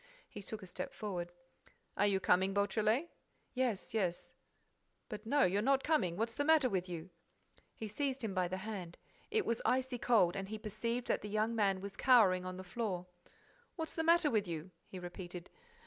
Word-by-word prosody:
He 210 - -9
took 210 +1 -5
a - - -7
step 180 - -6
forward. 180 -5 -4 0.6
"Are 205 - +3
you 195 -1 +2
coming, 190 +1 +3
Beautrelet?" 215 - +1 0.4
"Yes, 250 -7 -1
yes." 185 -6 -1 0.8
"But 215 -1 -7
no, 285 +3 +4
you're 195 +3 +3
not 270 +3 +3
coming—What's 230 - +1
the 285 - -1
matter 310 -3 +5
with 185 -5 -1
you?" 170 +1 -6 0.6
He 220 - -5
seized 270 +4 -2
him 215 -3 -2
by 185 -1 +1
the 185 +2 -3
hand. 185 -6 -5 0.3
It 435 -1 +1
was 230 - 0
icy 255 -1 +1
cold 205 -9 +4
and 195 0 -4
he 220 - -4
perceived 230 +3 -3
that - - 0
the 210 - -6
young 215 +2 +1
man 195 -4 +2
was 200 0 -6
cowering 195 -8 +5
on 185 0 -5
the 185 - -6
floor. 185 -2 -3 0.7
"What's 320 -2 -4
the 325 - -1
matter 335 -2 +5
with 210 -4 +1
you?" 170 +2 -5 0.2
he 190 - -8
repeated. 175 0 -7
210 Hz, 185 wpm, -35 LUFS, 185-245 Hz, 0.8 s, matter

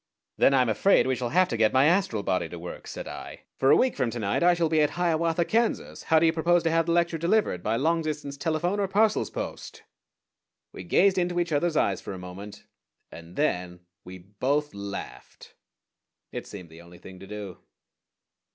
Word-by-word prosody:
_" - - -60 0.3
"Then 135 - +4
I 130 - +4
am 120 - -2
afraid 110 - +3
we 130 0 +1
shall 120 -1 -3
have 185 +6 +3
to 115 - -2
get 110 -1 +3
my 130 +1 +4
astral 165 - +1
body 90 -4 -1
to 85 - -8
work," 85 +1 -9
said - - -7
I; - - -9 0.2
"for 135 - +3
a - - +7
week 255 -1 +2
from 125 - 0
to 120 - -6
night 100 -3 -1
I 175 0 +5
shall 170 -1 +1
be 155 -1 +2
at 150 - 0
Hiawatha, 170 -1 +1
Kansas. 230 +4 -1
How 160 - +3
do 160 - +4
you 160 - +3
propose 170 +1 +2
to 165 - +1
have 165 0 +1
the - - +1
lecture 170 -1 +1
delivered 170 - +1
by 110 +5 -1
long 165 +7 +1
distance 150 -3 -4
telephone, 165 +6 -1
or 200 - +1
parcels 210 +3 +2
post?" - - -7 0.9
We - - -9
gazed 195 -1 +3
into 175 0 0
each 170 -1 -1
other's 155 +2 +1
eyes 100 -2 +1
for - - -7
a - - -7
moment, 90 +3 -10 0.5
and 85 +1 -12
then 90 -11 -1 0.2
we 90 +1 -10
both 130 +11 -2
laughed. 100 0 -9 0.8
It - - -6
seemed 90 -5 -10
the 80 +1 -13
only 85 0 -15
thing 95 +1 -13
to 95 - -11
do. 105 -3 -8
150 Hz, 215 wpm, -26 LUFS, -, 0.9 s, a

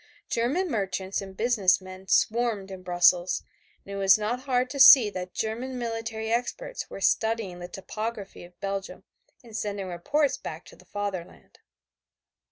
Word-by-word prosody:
German 270 +11 +1
merchants 195 -3 -2
and 190 -1 -10
business 215 -6 +3
men 185 0 -11
swarmed 220 -2 +1
in 190 -1 -8
Brussels, 175 0 +3 0.4
and 200 - -8
it - - -4
was 195 0 +5
not 215 +4 -2
hard 255 -1 +1
to 280 - -5
see 255 -5 +9
too - - -23
that 180 -1 -6
German 240 +4 -3
military 225 -2 -4
experts - - -3
were - - -8
studying 220 -4 +1
the 175 - -7
topography 210 +2 -6
of 175 0 -16
Belgium 195 -1 -4 0.4
and 230 -3 -12
sending 200 -2 -3
reports 280 - 0
back - - -8
to - - -14
the - - -20
Fatherland. 200 -4 -6
210 Hz, 160 wpm, -27 LUFS, 190-235 Hz, 0.4 s, see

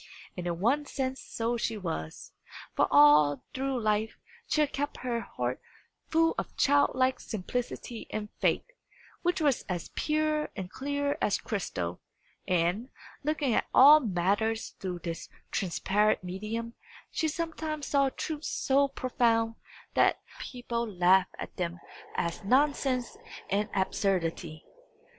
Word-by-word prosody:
And 180 -1 -4
in 170 -1 -2
one 280 +9 +2
sense 265 -1 -3
so 235 +1 -2
she 225 -1 -1
was, 160 - -5 0.4
for - - +3
all 145 -2 +6
through 265 -1 -1
life 215 0 0 0.3
she 305 - +2
had 295 - +1
kept 290 +2 -2
her 240 -2 0
heart 125 - -3 0.5
full 325 0 +3
of - - -6
childlike 260 -2 +3
simplicity 235 +2 -4
and 210 -1 -4
faith, - - +2 0.6
which 350 0 +1
was 290 -5 +2
as 175 -2 -3
pure 305 0 0
and 185 -2 -6
clear 285 +2 -2
as 200 - +2
crystal; 90 - -3 0.5
and, 180 +7 +1 0.3
looking 295 -4 +1
at - - +1
all 290 +4 +10
matters 215 - 0
through 180 -2 -4
this 165 -1 -5 0.2
transparent 195 +3 +1
medium, 215 +6 -4 0.4
she 320 - 0
sometimes 315 -2 -3
saw 275 -1 +3
truths 310 +3 -4
so 275 +1 +2
profound, 235 -4 +1 0.4
that - - +4
other - - -21
people 240 -2 -3
laughed 185 0 +4
at - - -7
them 175 -1 -2 0.4
as 170 +3 -2
nonsense 260 +1 +1 0.3
and 205 +2 +1
absurdity. 175 -5 -1
230 Hz, 130 wpm, -29 LUFS, 185-280 Hz, 0.6 s, all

